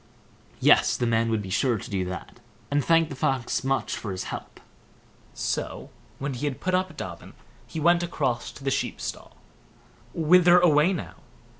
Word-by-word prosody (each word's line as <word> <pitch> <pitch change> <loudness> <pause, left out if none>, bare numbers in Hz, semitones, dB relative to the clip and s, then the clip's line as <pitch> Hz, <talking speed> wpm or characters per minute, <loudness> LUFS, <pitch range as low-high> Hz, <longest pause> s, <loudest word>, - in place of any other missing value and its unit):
Yes! - - +5
the 120 - 0
man 115 0 +1
would 110 -2 0
be 95 - -7
sure 120 +3 +2
to - - -8
do 95 -2 0
that, 90 -1 -7 0.3
and 145 0 +2
thanked 165 -2 +3
the - - -5
Fox 130 -1 -1
much 135 0 0
for 105 - -5
his 95 - -4
help. - - -8 0.8
So - - -3 0.3
when 140 0 -3
he 125 +4 -4
had 135 - -4
put 185 - -2
up 185 -3 0
Dobbin, 85 -2 -7 0.3
he 160 - -5
went 170 +2 +4
across 140 -8 -2
to 135 - -13
the 135 - 0
sheep - - -2
stall. - - -7 0.8
"Whither 175 +2 +6
away, 160 0 +4
now?" 180 - -4
140 Hz, 175 wpm, -26 LUFS, 115-165 Hz, 0.8 s, Whither